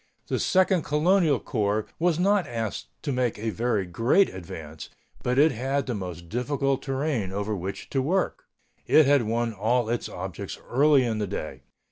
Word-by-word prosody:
The - - 0
Second 185 -1 +3
Colonial 155 -1 +2
Corps 105 -3 -1
was 170 -1 +2
not 195 -1 +2
asked 115 -3 -4 0.2
to 145 - -1
make 125 -3 0
a 110 +1 -2
very 110 -3 0
great 115 - +3
advance, 80 -4 -8 0.3
but 125 +1 -1
it 155 +3 +6
had 135 +3 -1
the 125 - -2
most 90 -4 -6
difficult 135 - -1
terrain 135 -7 -2
over 105 +2 -2
which 95 +1 -5
to 135 - +1
work. 180 +8 -1 0.4
It 155 - +6
had 140 -1 +4
won 115 +1 -1
all 110 +3 +1
its 120 0 -2
objects 95 +1 -6
early 140 +1 +5
in 115 -3 -1
the 105 - -1
day. - - -5
120 Hz, 170 wpm, -26 LUFS, 105-145 Hz, 0.4 s, it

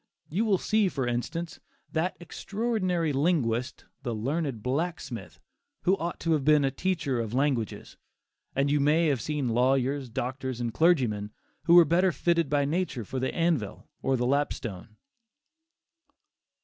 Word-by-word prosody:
You 195 +9 0
will 205 -3 +3
see 215 +1 +2
for 135 -6 -2
instance, 160 +8 -3 0.3
that 165 +3 -1
extraordinary 185 -4 -1
linguist 135 -5 0 0.2
the 120 -4 -3
"learned 135 0 -2
blacksmith," 135 - -3 0.4
who 185 - +4
ought 170 +1 -4
to 165 - 0
have 155 -3 +2
been 150 0 +4
a 135 - +1
teacher 145 -5 -1
of 115 0 -3
languages; 130 -6 -1 0.6
and 140 +1 +2
you 145 - +3
may 155 +3 +3
have 135 -5 0
seen 145 -1 -2
lawyers, 130 +2 +1
doctors 130 +1 -4
and 120 -2 -2
clergymen 125 -12 +2 0.4
who 170 - +6
were 175 -1 +9
better 175 +4 +3
fitted 170 -3 +1
by 145 -1 +2
nature 150 - -2
for 130 - -4
the 130 - -1
anvil 165 - -1
or 135 - +1
the 120 - 0
lapstone. 120 -7 -2
145 Hz, 150 wpm, -28 LUFS, 125-170 Hz, 0.6 s, were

